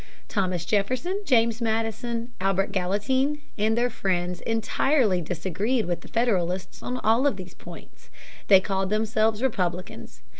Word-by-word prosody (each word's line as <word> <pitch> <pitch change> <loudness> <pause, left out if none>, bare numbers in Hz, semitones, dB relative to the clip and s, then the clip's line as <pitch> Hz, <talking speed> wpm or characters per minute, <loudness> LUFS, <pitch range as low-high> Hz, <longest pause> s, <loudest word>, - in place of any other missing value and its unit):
Thomas 185 -4 -1
Jefferson, 255 - 0
James 235 - +3
Madison, 230 +1 -2
Albert 195 +1 +1
Gallatin, 210 +10 0 0.2
and 220 +2 +1
their 245 +1 +2
friends 180 -4 -1
entirely 225 -2 +1
disagreed 190 +8 -1
with 175 -1 -2
the - - -12
Federalists 185 -6 -1
on 250 - -3
all 230 +6 +4
of 270 - 0
these 185 -1 -9
points. - - -13 0.4
They 190 -2 +7
called 190 -1 -1
themselves 215 +1 +1
Republicans. 180 - -3
215 Hz, 135 wpm, -25 LUFS, 185-235 Hz, 0.4 s, They